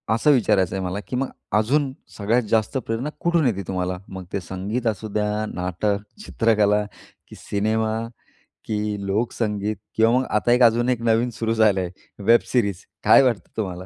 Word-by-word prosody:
असं 145 +6 +3
विचारायचं 105 -8 +2
आहे 95 -1 -2
मला, 90 +3 -3
की - - -4
मग 130 +1 -1 0.3
अजून 135 +6 +1 0.3
सगळ्यात 115 +4 +1
जास्त 110 +4 +1
प्रेरणा 115 +6 -2
कुठून 170 -3 +2
येते 100 -5 -1
तुम्हाला? 90 -1 -2
मग 95 -1 -7
ते 100 - 0
संगीत 100 +7 -3
असू 110 0 -2
द्या 105 0 0
नाटक, 90 +3 -1 0.3
चित्रकला 105 -2 +2 0.4
की - - -12
सिनेमा 110 +2 -1 0.7
की 105 -2 -2
लोकसंगीत 105 0 -1 0.2
किंवा 115 +1 +4
मग 130 - -1
आता 110 +3 +2
एक 125 +1 +5
अजून 120 +1 +4
एक 125 -2 0
नवीन 115 +1 +2
सुरू 115 0 -1
झालं 110 -4 +3
आहे, 90 - -4 0.3
वेब 115 +3 +5
सीरीज. 100 -7 0 0.2
काय - - +7
वाटतं 120 -5 0
तुम्हाला? 90 -4 -4
110 Hz, 170 wpm, -23 LUFS, 100-115 Hz, 0.7 s, काय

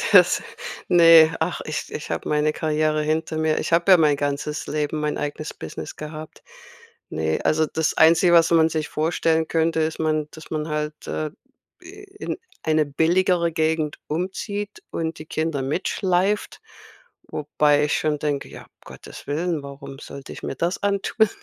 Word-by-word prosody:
das - - +6 0.5
ne, 165 -2 +7
ach, - - -1
ich - - -5
ich - - -6
habe - - -3
meine 150 0 +2
Karriere 155 0 0
hinter 155 +1 -1
mir. 155 0 +1
Ich - - -4
habe 170 +3 +5
ja 180 - +8
mein 150 -3 +4
ganzes 145 +1 -3
Leben, 150 0 -2
mein 150 0 -1
eigenes 150 +1 -4
Business 80 0 -8
gehabt. 155 0 -9 0.7
Ne, 80 0 -1
also, 155 0 +2
das 160 +1 -1
Einzige, 165 +2 +5
was 165 -1 +5
man 160 -1 +5
sich 155 -2 -2
vorstellen 160 0 +1
könnte, 160 0 +1
ist 160 +1 -2
man 155 -1 0
dass 160 - -13
man 155 0 -2
halt, 150 0 -4
äh, 155 -1 -3 0.5
in 405 +2 -8 0.3
eine 155 -1 +2
billigere 170 +4 +2
Gegend 160 -1 0
umzieht 200 +5 -4
und 160 -1 -3
die 155 - -8
Kinder 155 -2 -2
mitschleift, 185 +7 0 0.7
wobei 150 0 +2
ich 150 - 0
schon 155 -1 0
denke: 145 -2 -2
„Ja, - - -11 0.2
Gottes - - -12
Willen, 160 +1 -1
warum 140 -1 -9
sollte 140 -1 -9
ich - - -10
mir - - -4
das 170 +6 -2
antun?“ 200 +2 +2
155 Hz, 160 wpm, -23 LUFS, 150-165 Hz, 0.7 s, ja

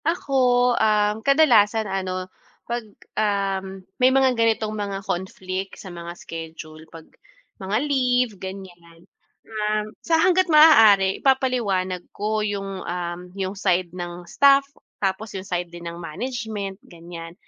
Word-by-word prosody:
Ako, 330 -4 -2 0.5
um, 210 -1 +3
kadalasan 225 -6 +4
ano 185 -2 -3 0.4
pag, 240 0 -3 0.4
um, 195 -2 -2 0.2
may 255 - +7
mga 265 -1 +3
ganitong 225 -2 +1
mga 200 -2 -4
conflict 185 +1 -4
sa 185 -3 -10
mga 170 0 -8
schedule 160 -1 -9
pag 165 -1 -12 0.6
mga 195 +3 -1
leave, 250 -4 +1
ganiyan. 175 -3 -10 0.4
Um, 215 0 -2
sa 330 -1 +2
hangga't 370 +2 +3
maaari 220 -12 +6
ipapaliwanag 225 -9 +1
ko 215 +1 -1
yung, 195 -2 -3
um, 175 0 -4 0.2
yung 190 0 -2
side 180 -3 0
ng 175 -1 -7
staff, 275 +8 +4 0.3
tapos 195 +1 -3
yung 190 - -7
side 175 -2 -3
din 170 0 -11
ng 170 - -9
management 210 +2 -5
ganiyan, 165 -1 -10
195 Hz, 125 wpm, -23 LUFS, 180-225 Hz, 0.6 s, may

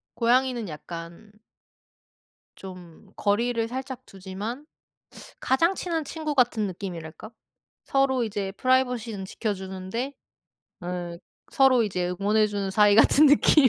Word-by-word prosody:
고양이는 245 -2 +2
약간 170 +6 -9 1.2
좀 185 0 -12
거리를 230 +2 0
살짝 260 +1 -6
두지만 200 +8 -7 0.8
가장 335 +8 +2
친한 330 -4 -2
친구 305 0 -4
같은 235 -5 +2
느낌이랄까? 175 0 -7 0.5
서로 265 -3 +2
이제 200 -2 -3
프라이버시는 245 -4 0
지켜주는데 190 +5 -4 0.7
어 175 -1 -4 0.4
서로 265 -3 +5
이제 180 -4 -1
응원해 210 +1 +3
주는 200 -2 -3
사이 205 0 +5
같은 280 +7 +6
느낌. 290 -1 +6
220 Hz, 260 characters per minute, -26 LUFS, 190-260 Hz, 1.2 s, 같은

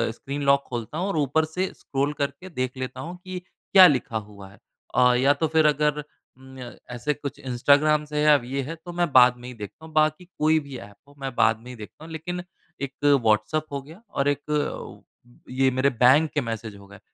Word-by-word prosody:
Screen 140 +3 -6
lock 140 0 +4
खोलता 120 +4 -5
हूँ 185 +4 -1
और 195 - -2
ऊपर 150 +2 +1
से 180 +4 -3
स्क्रॉल 140 +2 -2
करके 180 +6 -4
देख 130 -4 -3
लेता 130 0 -5
हूँ 175 +4 -7
कि 185 -1 -6
क्या 185 +1 +5
लिखा 125 -6 0
हुआ 100 -2 -10
है - - -19 0.4
अ 125 0 +5
या 135 +3 +4
तो 160 +3 -1
फ़िर 160 0 +2
अगर 150 0 +1 0.3
उम्म, 130 0 -14
य 120 -1 -9
ऐसे 135 +5 -2
कुछ 140 -1 -7
इंस्टाग्राम 145 +4 +3
से 150 0 -2
अब 140 - +2
ये 135 +2 -3
है 165 +5 -6
तो 175 - -6
मैं 175 -3 0
बाद 125 -1 +7
में 120 - -11
ही 125 - -7
देखता 105 +9 -10
हूँ। 160 - -14
बाकी 155 +3 +2
कोई 155 +1 +3
भी 140 -3 -9
ऐप 100 - -12
हो 145 - -19
मैं 135 -2 -5
बाद 110 0 +3
में 125 - -11
ही - - -9
देखता 110 +8 -12
हूँ। 165 - -11
लेकिन 175 +3 -5 0.4
एक 135 -1 -4 0.3
व्हाट्सऐप 110 +8 +2
हो 140 -1 -3
गया 160 +9 -15
और 140 +1 -1
एक 145 +1 -3 0.5
ये 130 +1 +2
मेरे 130 +2 +2
बैंक 130 +6 +4
के 145 - +1
मैसेज 115 -3 -5
हो 100 0 -15
गए 100 -1 -14
140 Hz, 220 wpm, -24 LUFS, 125-155 Hz, 0.5 s, बाद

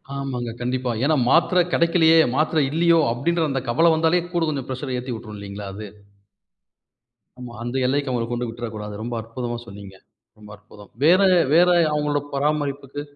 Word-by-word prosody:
ஆமாங்க. 130 -3 -4
கண்டிப்பா. 125 0 -2
ஏன்னா 155 +1 +3
மாத்திர 180 +2 +4
கிடைக்கலையே. 165 -1 +4 0.2
மாத்திரை 155 +1 +1
இல்லையோ? 165 +1 +3
அப்டின்ற 165 +7 -1
அந்தக் 135 -2 -3
கவல 165 +8 +4
வந்தாலே 165 +2 +2
கூடக் 170 -2 0
கொஞ்சம் 135 -3 -5
ப்ரஷர் 130 0 -4
ஏத்தி 125 0 -5
விட்ரும் 110 -2 -9
இல்லீங்களா 100 0 -8
அது? 105 0 -7 1.5
ஆமா. 125 -1 -9
அந்த 120 +2 -5
எல்லைக்கு 140 +1 0
அவங்கள 120 -2 -1
கொண்டு 120 0 -2
விட்ற 120 +1 -6
கூடாது. 105 -1 -7
ரொம்ப 120 +1 -5
அற்புதமா 120 +1 -5
சொன்னீங்க. 100 -1 -11 0.4
ரொம்ப 105 -1 -15
அற்புதம். 105 0 -17
வேற, 180 +5 +5 0.3
வேற 175 +2 +5 0.2
அவங்களோட 150 -1 0
பராமரிப்புக்கு, 145 -1 -2
130 Hz, 155 wpm, -22 LUFS, 120-160 Hz, 1.5 s, வேற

